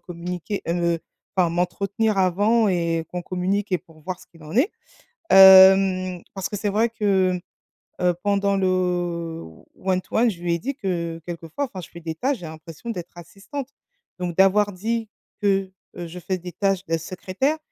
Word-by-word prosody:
communiquer 180 Hz, +3 st, -5 dB
heu, 170 Hz, 0 st, +1 dB, 0.4 s
enfin 180 Hz, -2 st, +4 dB
m'entretenir 195 Hz, +5 st, 0 dB
avant 205 Hz, +5 st, +3 dB
et 170 Hz, -3 st, 0 dB
qu'on 180 Hz, 0 st, -4 dB
communique 190 Hz, +3 st, -2 dB
et 180 Hz, -, +3 dB
pour 155 Hz, 0 st, -20 dB
voir 180 Hz, +3 st, -5 dB
ce -, -, -16 dB
qu'il 165 Hz, -2 st, -19 dB
en 155 Hz, -, -10 dB
est, 305 Hz, -, +4 dB, 0.6 s
hem, 190 Hz, -1 st, +8 dB
parce 195 Hz, -2 st, -3 dB
que -, -, -4 dB
c'est 205 Hz, +1 st, -1 dB
vrai 220 Hz, +4 st, +2 dB
que, 190 Hz, -5 st, +1 dB, 0.6 s
heu, 180 Hz, -1 st, +3 dB
pendant 200 Hz, -1 st, +2 dB
le 190 Hz, -, +1 dB, 1.1 s
one-to-one, 190 Hz, +5 st, +1 dB
je 175 Hz, -5 st, -9 dB
lui 170 Hz, -1 st, +1 dB
ai -, -, -1 dB
dit 275 Hz, +11 st, -4 dB
que, 170 Hz, -, -3 dB
quelquefois, 170 Hz, -, -4 dB
enfin, 190 Hz, -7 st, -8 dB
je 175 Hz, -, -11 dB
fais 170 Hz, -, -11 dB
des 160 Hz, -1 st, -4 dB
tâches, 265 Hz, -, 0 dB
j'ai 175 Hz, -, -8 dB
l'impression 160 Hz, +7 st, -9 dB
d'être 175 Hz, -5 st, -7 dB
assistante. 195 Hz, -, -8 dB, 0.5 s
Donc 175 Hz, -2 st, -3 dB
d'avoir 205 Hz, +2 st, +4 dB
dit 225 Hz, +4 st, -2 dB, 0.3 s
que, 195 Hz, -1 st, +1 dB, 0.3 s
heu, 175 Hz, -1 st, -5 dB
je 175 Hz, +2 st, -8 dB
fais 185 Hz, +2 st, -3 dB
des 180 Hz, 0 st, -8 dB
tâches 195 Hz, -1 st, 0 dB
de 165 Hz, -, +1 dB
secrétaire, 190 Hz, -, -2 dB
185 Hz, 175 wpm, -23 LUFS, 175-205 Hz, 1.1 s, hem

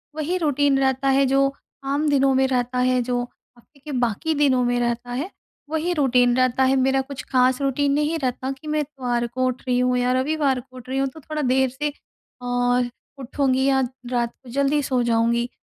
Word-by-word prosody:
वही 315 Hz, +4 st, -1 dB
रूटीन 285 Hz, -4 st, +2 dB
रहता 265 Hz, 0 st, +1 dB
है 275 Hz, -, +4 dB
जो 275 Hz, +1 st, +2 dB, 0.3 s
आम 285 Hz, +3 st, 0 dB
दिनों 275 Hz, -1 st, +3 dB
में 265 Hz, 0 st, +3 dB
रहता 250 Hz, -1 st, -1 dB
है, 255 Hz, 0 st, +2 dB
जो 245 Hz, 0 st, -1 dB, 0.4 s
हफ्ते 280 Hz, +4 st, -24 dB
के 295 Hz, +2 st, -9 dB
बाकी 245 Hz, +7 st, 0 dB
दिनों 270 Hz, -4 st, +3 dB
में 245 Hz, 0 st, +1 dB
रहता 240 Hz, 0 st, -2 dB
है, 275 Hz, +9 st, -3 dB, 0.4 s
वही 320 Hz, +3 st, -1 dB
रूटीन 250 Hz, -5 st, +3 dB
रहता 255 Hz, 0 st, +2 dB
है। 260 Hz, +1 st, +3 dB
मेरा 265 Hz, 0 st, +2 dB
कुछ 265 Hz, 0 st, -7 dB
खास 255 Hz, 0 st, +3 dB
रूटीन 275 Hz, +1 st, +1 dB
नहीं 300 Hz, +3 st, 0 dB
रहता 260 Hz, -1 st, -2 dB
कि 270 Hz, +3 st, -10 dB
मैं 305 Hz, 0 st, 0 dB
इतवार 250 Hz, -5 st, -2 dB
को 255 Hz, +2 st, -2 dB
उठ 255 Hz, 0 st, -3 dB
रही 250 Hz, -1 st, +2 dB
हूँ 250 Hz, 0 st, +2 dB
या 250 Hz, 0 st, +1 dB
रविवार 275 Hz, 0 st, +1 dB
को 255 Hz, +1 st, -15 dB
उठ 250 Hz, -, -12 dB
रही 265 Hz, -, -2 dB
हूँ 270 Hz, -, +1 dB
तो 290 Hz, -, -13 dB
थोड़ा 310 Hz, +1 st, -5 dB
देर 265 Hz, -1 st, +2 dB
से 290 Hz, +4 st, -3 dB, 0.5 s
और 245 Hz, 0 st, +1 dB, 0.3 s
उठूँगी 265 Hz, 0 st, 0 dB
या 270 Hz, -1 st, +3 dB, 0.3 s
रात 240 Hz, -1 st, 0 dB
को 250 Hz, -, -13 dB
जल्दी 280 Hz, +3 st, +1 dB
सो 255 Hz, -2 st, 0 dB
जाऊँगी। 235 Hz, +1 st, +1 dB
265 Hz, 205 wpm, -22 LUFS, 245-280 Hz, 0.5 s, है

